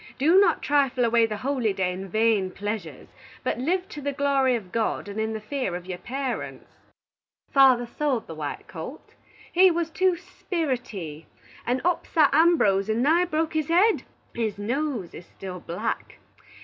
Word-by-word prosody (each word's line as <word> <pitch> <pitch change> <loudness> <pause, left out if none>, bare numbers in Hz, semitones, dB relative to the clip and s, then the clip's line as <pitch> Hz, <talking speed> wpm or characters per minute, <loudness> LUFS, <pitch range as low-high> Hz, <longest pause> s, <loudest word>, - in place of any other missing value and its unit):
Do 325 +8 +5
not 350 -5 +3
trifle 270 -4 +2
away 230 0 +4
the 215 -1 -4
holy 255 -7 +1
day 185 -1 0
in 190 +1 -6
vane 215 -2 +2
pleasures, 200 -6 -5 0.3
but 255 - -1
live 360 +8 0
to 295 - -8
the 285 0 -1
glory 275 -2 +2
of 195 -6 -6
God, 225 -2 -1
and 205 +1 -5
in 220 0 -1
the 220 - -3
fear 215 -4 -3
of 175 0 -6
your 180 -1 -6
parents. 260 +5 -4 0.9
Father 260 -3 +5
sold 260 -1 -1
the - - -8
white 150 -2 -6
colt. 180 - -9 0.4
He 370 +2 +7
was 335 -1 -1
too 370 +1 +2
spirity, 250 - -4 0.4
and 250 +2 0
upsat 330 -4 +2
Ambrose 275 - +4
and 225 +3 +1
nigh 330 +5 +4
broke 320 -2 -1
his 310 -2 0
head. 375 +7 +4 0.3
His 220 -4 -2
nose 240 - -2
is 170 - -11
still 185 -2 -8
black. 180 +7 -4
250 Hz, 165 wpm, -25 LUFS, 205-310 Hz, 0.9 s, He